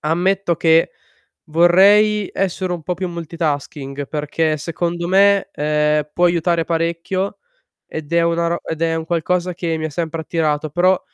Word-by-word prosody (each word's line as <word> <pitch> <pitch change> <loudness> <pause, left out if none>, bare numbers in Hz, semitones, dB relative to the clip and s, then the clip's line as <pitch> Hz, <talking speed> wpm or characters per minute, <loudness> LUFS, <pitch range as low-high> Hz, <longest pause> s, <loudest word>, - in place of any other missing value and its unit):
ammetto 175 +2 0
che 165 0 +3 0.6
vorrei 195 +6 +4
essere 185 -1 -2
un 170 -3 -4
po' 180 - -2
più 185 +1 -4
multitasking, 150 -4 -4
perché 155 +1 -1
secondo 170 +2 -3
me, 200 +1 +4
ehm, 150 0 0
può 175 - +2
aiutare 170 -1 +1
parecchio 170 +4 -2 0.5
ed 155 -1 -7
è 170 0 +3
una 170 0 +1
ro 170 +1 -1
ed 160 0 -5
è 165 0 +1
un 160 0 -3
qualcosa 175 +2 -1
che 165 -2 -2
mi 155 - -3
ha - - -3
sempre 165 +1 -3
attirato, 155 -2 -1
però 180 +4 +2
170 Hz, 155 wpm, -19 LUFS, 155-180 Hz, 0.6 s, vorrei